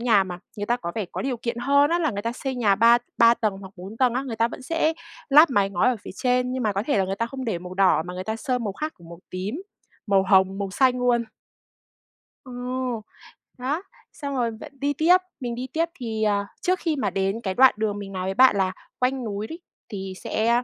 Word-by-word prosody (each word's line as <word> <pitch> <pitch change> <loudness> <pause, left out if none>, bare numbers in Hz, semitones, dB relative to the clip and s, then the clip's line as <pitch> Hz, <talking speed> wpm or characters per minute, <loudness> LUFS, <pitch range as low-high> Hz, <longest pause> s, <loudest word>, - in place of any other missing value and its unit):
nhà 220 -5 +4
mà 180 -1 -6 0.2
người 205 0 -3
ta 240 - +2
có 170 -8 -5
vẻ 215 -3 -2
có - - -3
điều 265 -2 -1
kiện 235 0 -4
hơn 280 +4 +3
á 345 - +2
là 315 -5 +1
người 205 -1 -4
ta 230 +1 -2
xây 265 +1 -4
nhà 215 -5 +3
ba 230 +3 +6 0.2
ba 230 0 +7
tầng 215 -4 -1
hoặc 190 0 -11
4 195 +5 -9
tầng 250 -2 +2
á, 260 - 0
người 230 -4 -5
ta 230 +1 +2
vẫn - - -9
sẽ 325 +2 +1 0.4
lắp 300 +3 +8
mái 200 -5 +2
ngói 185 +6 +2
ở 250 - +1
phía - - -8
trên, 250 0 +1
nhưng 260 -1 -2
mà 215 - +1
có 200 +1 -1
thể 255 -4 +1
là 190 - +3
người 195 +1 -3
ta 230 +2 -1
không 265 +1 -6
để 220 -7 -1
màu 180 +1 -9
đỏ 185 -5 +4
mà 180 - -6
người 185 +1 -5
ta 220 +2 -2
sơn 250 +1 -2
màu 205 - -2
khác, 310 +9 -4
kiểu, 170 - -15
màu 170 +1 -11
tím, 205 - -4 0.4
màu 195 -1 +4
hồng, 190 0 +3
màu 200 -1 -3
xanh 250 +4 +3
luôn. 240 -1 +2 1.2
Ờ, 255 - -10 1.1
đó, 280 +7 -2 0.3
xong 280 -3 -5
rồi 235 -2 0
bạn 220 - -10
đi 285 +1 0
tiếp, 340 +6 +5 0.2
mình 240 -3 -3
đi 255 +2 -5
tiếp 330 +1 +2
thì, 220 -2 -3
à, 200 -1 +1
trước 370 0 +1
khi 320 -3 0
mà 210 -8 0
đến 195 +4 -1
cái 190 -4 -2
đoạn 260 +5 +6
đường 215 -2 -1
mình 195 -1 -7
nói 185 -1 -3
với 190 - -1
bạn 260 +2 +6
là 190 -1 +1 0.3
quanh 255 0 0
núi 210 -1 -4
đấy, 330 +7 -8 0.3
thì 195 -3 -5
sẽ, 220 - -1
a, 240 +1 +3
230 Hz, 255 wpm, -24 LUFS, 195-260 Hz, 1.2 s, lắp